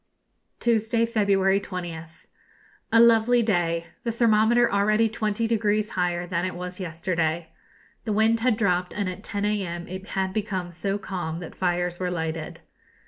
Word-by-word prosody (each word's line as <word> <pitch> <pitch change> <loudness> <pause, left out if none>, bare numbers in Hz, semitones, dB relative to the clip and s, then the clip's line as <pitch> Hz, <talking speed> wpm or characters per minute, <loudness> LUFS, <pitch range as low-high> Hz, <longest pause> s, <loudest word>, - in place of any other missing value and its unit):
Tuesday, 230 0 +2
February 200 -3 +2
20th. 165 -4 -7 0.7
A 230 - +6
lovely 235 +1 +5
day; 170 -5 0 0.2
the 235 - -1
thermometer 230 +1 +3
already 215 +3 +3
twenty 215 0 -1
degrees 215 -1 +1
higher 175 -1 -1
than 175 -1 -2
it 185 - -3
was 180 +1 -6
yesterday. 165 -2 -2 0.6
The 215 - -1
wind 220 +2 +3
had 235 -2 +2
dropped, 180 -4 +1
and 205 -2 -1
at 185 +2 -6
10 205 -2 -2
a.m. 185 -5 -2
it 190 +2 -7
had 190 -1 -2
become 195 -4 -3
so 195 +4 -2
calm 175 -5 -4
that 165 - -8
fires 175 -1 -1
were 180 -1 -1
lighted. 160 -2 -4
195 Hz, 150 wpm, -25 LUFS, 175-220 Hz, 0.7 s, A